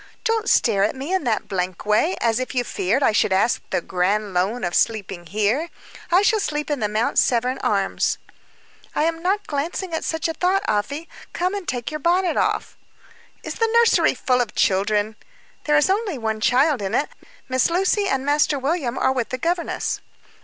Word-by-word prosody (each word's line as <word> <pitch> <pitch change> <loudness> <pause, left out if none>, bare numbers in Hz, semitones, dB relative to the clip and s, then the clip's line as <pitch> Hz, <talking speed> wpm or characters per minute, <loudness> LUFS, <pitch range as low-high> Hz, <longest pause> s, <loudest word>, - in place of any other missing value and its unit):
Don't 455 0 0
stare 200 -4 +3
at 210 - 0
me 275 +7 -4
in 375 -7 0
that 225 -3 0
blank 185 -2 -3
way, 215 - +2
as 230 0 +1
if 255 +1 -4
you 245 - +2
feared 230 +4 0
I - - +4
should 210 - +2
ask 195 +5 +2
the - - 0
grand 195 +4 -1
loan 195 +7 0
of 175 - -2
sleeping 195 -6 -1
here. 215 - 0 0.4
I 365 +3 +5
shall 435 +1 +3
sleep 300 -5 -2
at 290 - -1
the 210 -2 -1
Mount 215 +2 +1
Severn 250 +2 +1
Arms." 195 -2 0 0.8
"I 305 - +2
was 330 0 -12
not 390 +4 0
glancing 330 +5 -3
at 320 - -2
such 320 0 -1
a 325 - -2
thought, 370 +5 +1
Afy. 280 +10 -1 0.3
Come 365 +2 -1
and 400 -3 -5
take 245 +3 -3
your 305 - -4
bonnet 355 +3 +2
off." - - -1 0.7
"Is - - -6
the 455 -1 +2
nursery 470 -1 +4
full 250 -1 +1
of 230 -3 -4
children?" 205 +2 +1 0.5
"There 295 0 +3
is 295 - +4
only 390 -4 0
one 220 -2 -3
child 265 +2 +3
in 195 -1 -2
it. 290 - 0 0.4
Miss 260 +2 +2
Lucy 385 +4 +1
and 270 -6 -1
Master 290 0 +2
William 270 -2 -1
are - - +2
with 250 -3 -2
the 255 - -3
governess." 335 +5 -2
260 Hz, 195 wpm, -22 LUFS, 215-335 Hz, 0.8 s, I